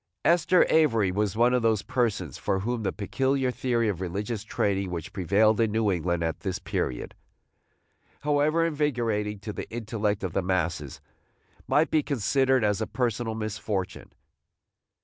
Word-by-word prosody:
Esther 175 +1 +4
Avery 115 -12 +3
was 100 +1 -1
one 120 +2 +4
of 125 - +2
those 110 -3 +2
persons 115 - -1
for 95 - -1
whom 120 +2 -2
the 100 - -1
peculiar 130 +5 0
theory 120 -2 0
of 95 -4 -2
religious 100 +5 -3
training 100 -3 -1
which 85 -3 -6
prevailed 105 +4 +3
in 110 -2 +2
New 110 -1 +1
England 85 -1 -1
at 80 0 -2
this 95 +2 -3
period, - - -3 1.1
however 150 +3 +2
invigorating 120 -9 -1
to 105 +2 -7
the - - -6
intellect 110 -3 -2
of 90 -4 -3
the 95 - +1
masses, 85 -6 -2 0.7
might 155 +2 +2
be 155 - +3
considered 130 -1 +1
as 105 0 +1
a 110 - -1
personal 120 -2 -1
misfortune. 110 -3 -4
110 Hz, 150 wpm, -27 LUFS, 95-125 Hz, 1.1 s, Esther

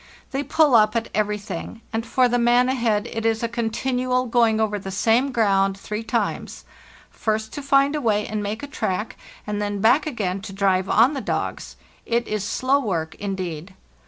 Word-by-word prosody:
They 270 - -1
pull 300 -1 +3
up 215 -1 +5
at 230 0 -1
everything, 210 +2 -3
and 225 0 -1
for 255 +1 +2
the 245 0 +1
man 240 +1 +4
ahead 230 -5 0
it 225 - -3
is 225 0 +1
a - - +2
continual 250 +2 -1
going 230 -2 +2
over 210 -2 0
the 195 - -7
same 225 +7 +2
ground 195 -4 +2
three 210 +2 -5
times: 225 - -3 0.5
first 220 0 -2
to 290 - -5
find 275 +1 +3
a 300 - -2
way 210 -4 +1
and 215 -1 -3
make 210 +5 -4
a - - -4
track, 210 -7 -3 0.3
and 210 0 -3
then 205 -1 -2
back 245 +9 +4
again 195 -9 -2
to 195 -1 -8
drive 190 -1 +1
on 240 +7 +5
the 275 - -3
dogs; - - -3 0.3
it 235 0 0
is 215 -2 -2
slow 255 +6 +1
work 170 - -2
indeed. 185 -3 -5
225 Hz, 190 wpm, -23 LUFS, 205-250 Hz, 0.5 s, up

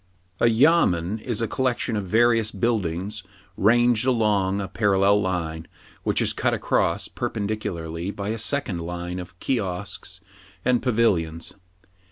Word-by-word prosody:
A - - +4
YAMEN 110 - +3
is 115 0 -2
a - - 0
collection 125 -1 -1
of 100 -3 -3
various 115 +1 +3
buildings 100 -2 -1 0.3
ranged 120 +2 +4
along 105 -5 +2
a 100 - -3
parallel 100 -1 +3
line, 85 -4 -3 0.3
which - - +1
is - - +1
cut - - +1
across - - 0
perpendicularly 90 -5 -3
by 100 0 -4
a 110 +1 -2
second 115 -6 -1
line 90 +1 -5
of 90 0 -10
kiosks 95 -6 -3 0.5
and 125 -1 +3
pavilions. 90 -10 0
100 Hz, 130 wpm, -24 LUFS, 90-115 Hz, 0.5 s, A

